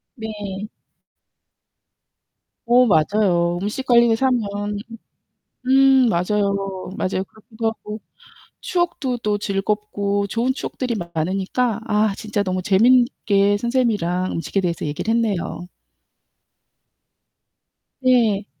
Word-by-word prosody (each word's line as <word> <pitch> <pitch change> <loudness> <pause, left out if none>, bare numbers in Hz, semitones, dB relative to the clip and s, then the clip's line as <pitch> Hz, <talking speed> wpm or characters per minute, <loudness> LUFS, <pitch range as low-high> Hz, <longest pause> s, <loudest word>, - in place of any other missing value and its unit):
네. 210 -3 -6 2.0
어 245 +1 +5
맞아요. 175 -1 +2
음식 215 +6 -3
관련해서 235 +1 +4
하면 205 -4 -1 0.9
음 265 -1 +5
맞아요. 200 +3 +1 0.4
맞아요. 185 0 -1
그렇기도 220 +2 -8
하고 215 -1 -6 0.6
추억도 340 -8 -1
또 210 -3 -1
즐겁고 205 0 -1
좋은 230 +6 0
추억들이 255 -2 -4 0.2
많으니까 195 +8 -1
아 210 -1 +2
진짜 210 -2 -2
너무 185 -1 -2
재밌게 205 -1 +3
선생님이랑 210 -7 0
음식에 180 +4 -2
대해서 175 -3 -2
얘기를 155 +10 -2
했네요. 205 -6 -1 2.4
네. 230 -6 +3
210 Hz, 225 characters per minute, -21 LUFS, 195-235 Hz, 2.4 s, 어